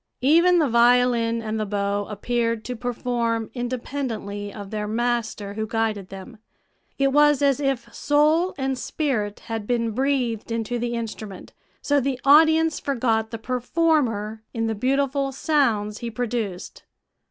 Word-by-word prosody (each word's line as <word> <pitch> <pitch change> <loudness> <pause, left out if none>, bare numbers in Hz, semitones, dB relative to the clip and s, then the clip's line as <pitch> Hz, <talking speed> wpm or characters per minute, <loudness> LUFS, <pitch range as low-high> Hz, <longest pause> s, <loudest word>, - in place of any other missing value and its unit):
Even 340 +6 +5
the 315 -4 +3
violin 235 -1 +3
and 220 0 -3
the 215 - -1
bow 200 0 -1
appeared 230 +2 -2
to 250 - -4
perform 235 -1 -2
independently 240 -5 -4
of 200 -2 -9
their 210 -1 -3
master 225 -3 -2
who 220 +1 -3
guided 220 -4 -2
them; 195 +4 -10 0.6
it 275 0 +3
was 295 0 +4
as 275 -2 +3
if 275 -3 -2
soul 310 +5 +2
and 265 -2 -2
spirit 220 -10 -2
had 225 -3 -5
been 230 -2 0
breathed 245 -3 -1
into 230 +1 -2
the 240 0 -2
instrument, 220 -4 -7 0.3
so 290 0 +3
the 265 -1 -2
audience 315 +2 +5
forgot 230 -5 0
the 230 - -5
performer 245 -3 0
in 225 0 0
the 225 - 0
beautiful 275 +4 0
sounds 235 -8 0
he 235 - -4
produced. 225 -5 -4
235 Hz, 140 wpm, -23 LUFS, 220-275 Hz, 0.6 s, Even